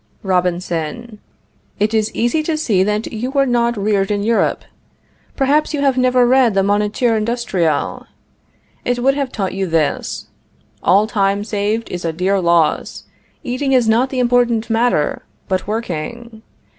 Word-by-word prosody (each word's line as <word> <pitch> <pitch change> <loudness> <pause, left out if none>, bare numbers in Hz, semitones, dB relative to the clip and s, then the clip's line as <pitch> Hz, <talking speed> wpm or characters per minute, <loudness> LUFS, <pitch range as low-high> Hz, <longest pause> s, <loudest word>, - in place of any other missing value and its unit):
Robinson. 180 +3 -2 0.6
It 210 +2 +1
is 220 -1 +1
easy 240 +7 +1
to 310 0 -2
see 215 -11 +1
that 210 +4 -1
you 230 +4 -3
were 275 0 +2
not 235 -2 +1
reared 200 -1 0
in 205 -1 -1
Europe. 230 +1 +1 0.7
Perhaps 295 +3 +1
you 285 - -2
have 275 -2 +2
never 255 -1 +3
read 245 -3 +3
the 195 - +3
Moniteur 210 +4 +1
Industriel? 215 -9 -1 0.8
It 245 0 0
would 265 +3 +2
have 275 -2 -3
taught 195 -3 -3
you 190 0 -2
this: 160 -3 -1 0.6
"All 195 +4 +4
time 200 -2 0
saved 215 +1 -2
is 180 -1 -5
a 165 - -1
dear 185 +4 0
loss. 170 -2 +1 0.4
Eating 270 +1 -1
is 250 -3 +3
not 235 +4 +3
the 265 - -5
important 240 -2 +1
matter, 225 -9 +1 0.3
but 185 0 -2
working. 220 +2 -5
220 Hz, 150 wpm, -18 LUFS, 195-245 Hz, 0.8 s, All